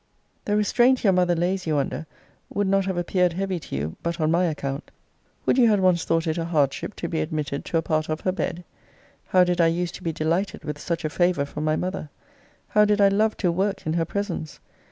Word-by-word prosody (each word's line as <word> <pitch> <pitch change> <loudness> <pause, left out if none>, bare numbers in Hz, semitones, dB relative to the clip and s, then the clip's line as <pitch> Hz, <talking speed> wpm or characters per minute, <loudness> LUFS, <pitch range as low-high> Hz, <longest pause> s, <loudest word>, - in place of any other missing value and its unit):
The 205 0 +1
restraint 245 +5 +3
your 195 -3 +4
mother 180 -1 +3
lays 180 +2 -1
you 155 -2 +1
under 140 +2 -2 0.4
would 205 - 0
not 195 0 +2
have 190 -2 -2
appeared 180 0 +1
heavy 190 0 -2
to 145 - -7
you 75 +3 -3
but 170 +1 -3
on 155 0 +2
my 175 +2 +3
account. 140 -3 -3 0.6
Would 260 - +3
you 235 -2 +6
had 210 -2 +3
once 185 -3 +2
thought 165 0 +1
it 160 +1 -1
a 165 - -2
hardship 150 -5 0
to - - -4
be - - -1
admitted 145 - -3
to 165 - 0
a 165 - 0
part 155 0 -1
of 155 0 -2
her 185 - +1
bed? 180 -2 -3 0.6
How 185 -1 +5
did 180 0 +1
I 165 - +5
use 170 +1 0
to - - -10
be 165 - -1
delighted 165 +5 -1
with 150 -1 -5
such 165 +1 -3
a - - 0
favour 175 -3 +2
from 150 +2 -5
my 155 0 +2
mother! 180 -3 -3 0.6
how 210 - +5
did 210 0 +2
I 200 -1 +6
love 215 +2 +1
to 180 -3 +1
work 195 +2 -1
in 155 - 0
her 165 -1 +1
presence! 170 -5 -4
175 Hz, 235 wpm, -24 LUFS, 155-190 Hz, 0.6 s, you